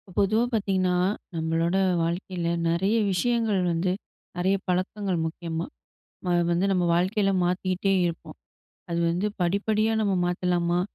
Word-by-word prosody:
பொதுவா 215 +4 +3
பார்த்தீங்கன்னா, 190 -4 +1 0.4
நம்மளோட 165 +2 0 0.3
வாழ்க்கையில 170 0 -2 0.2
நெறைய 190 +7 +1
விஷயங்கள் 220 0 +1
வந்து 170 +2 0 0.5
நெறைய 190 +2 +2
பழக்கங்கள் 185 +1 -1
முக்கியமா 165 0 -4 0.9
வந்து, 175 +3 +2
நம்ம 180 -2 +2
வாழ்க்கையில 195 +3 +2
மாத்திட்டே 185 +2 0
இருப்போம். 165 -2 -5 0.5
அது 170 - -1
வந்து 180 +5 0
படிப்படியா 210 +5 +1
நம்ம 200 -2 +1
மாத்தலாமா? 175 -1 0
180 Hz, 110 wpm, -26 LUFS, 170-195 Hz, 0.9 s, பொதுவா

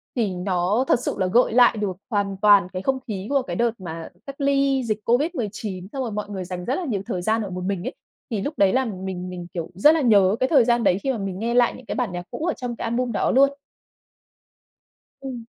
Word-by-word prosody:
Thì 215 -6 0
nó 180 +5 0
thật - - +3
sự - - -3
là 185 - +2
gợi 230 +3 +3
lại 245 -2 +5
được 195 -4 -2
hoàn 200 -3 -1
toàn 205 -3 +6
cái 185 - -3
không 265 +4 0
khí 200 -2 -4
của 280 -1 +2
cái 255 - -5
đợt 235 0 +2
mà 165 -2 -7 0.2
cách 275 +1 -8
ly 275 -1 +2
dịch 215 -2 -1
COVID-19, 220 - -1
xong 270 - -3
rồi 230 - -4
mọi 210 0 -4
người 190 -2 -4
dành 180 0 -6
rất 260 - 0
là 365 - -3
nhiều 210 -9 -2
thời 180 -2 -3
gian 220 +4 +1
ở 200 - -4
một 180 0 -5
mình 190 -1 -2
ấy. - - -4 0.4
Thì 210 - -1
lúc 290 +9 -3
đấy 195 +1 +4
là 260 0 +2
mình 185 -3 -5
mình, 175 -1 -7
kiểu, 170 -2 -4
rất 300 - +6
là 315 - +1
nhớ 205 -5 +4
cái 260 - +1
thời 265 -7 +5
gian 240 -1 +2
đấy 180 - +3
khi 270 - +1
mà 240 - -2
mình 195 -2 -4
nghe 235 +2 -1
lại 245 -1 +4
những 255 - -14
cái - - -4
bản 240 -7 -1
nhạc 175 0 -5
cũ 320 - -4
ở 345 - +1
trong 245 -2 -5
cái - - -6
album 235 +1 -1
đó - - +1
luôn. 275 +2 +5 1.7
Ừm. 255 -4 -6
220 Hz, 255 wpm, -23 LUFS, 190-255 Hz, 1.7 s, toàn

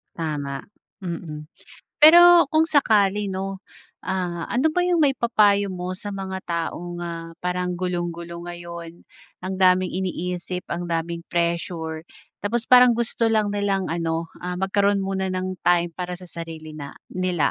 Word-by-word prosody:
Tama. 145 -4 -4 0.4
Mm. 165 -3 -5 0.6
Pero 345 +1 +9
kung 315 - +6
sakali 210 -9 +3
'no, 195 0 -4 0.5
ah, 180 -3 -2
ano 265 +6 +1
ba 360 - 0
yung 350 -3 +3
maipapayo 215 -7 +3
mo 180 -1 -4
sa 205 0 -5
mga 190 -1 -4
taong, 175 +1 -4
ah, 165 -1 -6
parang 180 0 -1
gulong-gulo 175 -1 -4
ngayon, 170 -1 -8 0.4
ang 190 +1 -3
daming 185 -1 +4
iniisip, 180 0 -3
ang 175 +1 -3
daming 170 0 -3
pressure. 170 -2 -2 0.3
Tapos 225 +3 -1
parang 250 -1 +7
gusto 235 0 0
lang 215 -2 +2
nilang 200 -2 -1
ano, 165 0 -2
ah, 180 0 -4
magkaroon 200 +2 +1
muna 190 0 -2
ng 185 0 -3
time 175 -1 +3
para 180 +1 -5
sa 180 0 -10
sarili 160 -2 -8
na 140 -1 -8 0.2
nila. 180 -3 0
180 Hz, 140 wpm, -23 LUFS, 170-200 Hz, 0.6 s, Pero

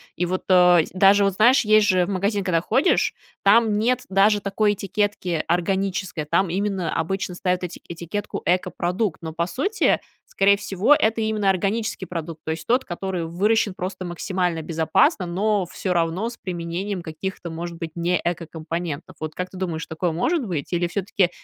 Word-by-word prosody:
И 180 - 0
вот, 185 +1 -2
э, 180 -3 +6
даже, 195 +2 +5
вот 195 -1 +2
знаешь, 240 +7 +5
есть 215 0 +5
же 185 -3 +3
в - - -5
магазин, 200 +1 0
когда 170 -3 +1
ходишь, 275 - +2 0.3
там 215 +1 +5
нет 240 +3 +1
даже 200 +2 +4
такой 205 +1 +1
этикетки- 200 -4 -1
"органическое", 185 -2 -1
там 170 +4 +1
именно 190 -2 -1
обычно 180 +2 -2
ставят 180 0 -1
эти 180 -1 -6
этикетку 170 +4 -5
"экопродукт", 180 +1 0
но, 160 -1 -6
по 170 +1 0
сути, 360 - +1 0.3
скорее 200 +1 +3
всего, 200 +8 +2
это 225 -4 +2
именно 215 -2 +1
органический 200 +2 -1
продукт, 165 -2 -6
то 160 - -3
есть, 160 0 -5
тот, 250 +3 +3
который 180 -1 -3
выращен 205 +5 +1
просто 185 +1 -5
максимально 175 -1 -2
безопасно, 165 - +2
но 200 +2 0
всё 180 +1 -3
равно 170 +6 0
с 235 - -11
применением 180 +2 -4
каких-то, 170 +2 -6
может 170 +1 -6
быть, 165 -1 -5
не 175 +1 +1
экокомпонентов. 165 -2 -4
Вот 155 0 -5
как 180 0 -4
ты 185 - -11
думаешь, 170 -4 -3
такое 165 +2 -2
может 270 - 0
быть? 165 -9 -4
Или 175 0 +1
всё-таки, 185 0 0
185 Hz, 170 wpm, -23 LUFS, 170-205 Hz, 0.3 s, э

